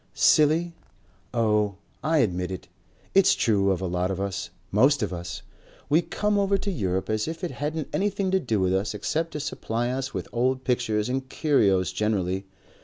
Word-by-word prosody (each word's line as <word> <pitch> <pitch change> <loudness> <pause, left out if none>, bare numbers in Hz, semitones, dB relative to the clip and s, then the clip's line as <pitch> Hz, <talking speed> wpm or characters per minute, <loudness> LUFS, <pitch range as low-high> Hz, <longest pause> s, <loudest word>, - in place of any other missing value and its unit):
"Silly? 160 +3 +4 0.6
Oh! 105 -4 +1 0.3
I 160 +2 +2
admit 90 -2 -3
it. 95 -2 -6 0.5
It's 195 -1 +5
true 100 -4 +2
of 95 -1 0
a - - -1
lot 90 +1 -1
of 95 -1 -3
us. 100 0 -3 0.2
Most 130 +5 +4
of 100 - -2
us. 85 -3 -6 0.5
We 155 +3 +5
come 210 +3 0
over 200 0 +2
to 200 +1 -3
Europe 95 - -1
as 110 +3 -1
if 160 +2 -5
it 180 - -2
hadn't 150 +1 -3
anything 200 -1 0
to 190 - +3
do 115 - -1
with 95 0 +2
us 100 +3 -1
except 160 +11 -1
to 150 - -3
supply 120 -4 -2
us 135 +1 -3
with - - -4
old 130 +2 +1
pictures 115 -4 0
and 130 +1 -2
curios 100 - +2
generally. 95 -2 -1
115 Hz, 180 wpm, -26 LUFS, 95-155 Hz, 0.6 s, It's